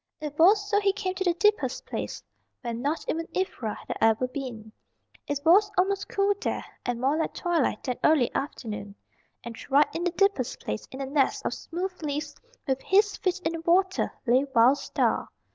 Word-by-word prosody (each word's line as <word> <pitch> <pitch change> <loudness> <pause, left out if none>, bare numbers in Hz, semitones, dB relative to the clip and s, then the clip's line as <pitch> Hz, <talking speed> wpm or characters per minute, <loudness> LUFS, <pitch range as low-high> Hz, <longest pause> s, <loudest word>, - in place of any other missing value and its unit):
It 300 -1 -6
was 405 +4 +5
so 410 0 +3
he 400 -1 +2
came 380 -2 -3
to 380 - -2
the 350 -2 +2
deepest 420 +4 +1
place; - - -5 0.4
where 235 - -4
not 285 +8 -2
even 330 +1 -2
Ivra 255 - -2
had - - -6
ever 225 +3 +3
been. 245 -5 -7 0.6
It 290 -1 -2
was 400 +5 +6
almost 390 +2 +1
cool 400 0 +2
there, - - -2 0.2
and 245 -1 -1
more 270 +4 +2
like 320 - -2
twilight 335 - 0
than 250 -3 -3
early 295 -6 +4
afternoon. 210 -7 -5 0.5
And 235 -1 -7
right 280 +2 +6
in 335 - -3
the 360 - +2
deepest 370 - +1
place, 105 0 -5
in 265 - -7
a - - -2
nest 275 0 +1
of - - 0
smooth 365 +2 -5
leaves, 295 -1 -3 0.3
with 265 -1 0
his 410 +2 +3
feet 370 -2 -1
in - - +2
the 330 - -5
water, 375 +3 +2
lay 250 +2 +4
Wild 245 +5 +6
Star. - - 0
315 Hz, 190 wpm, -27 LUFS, 255-380 Hz, 0.6 s, was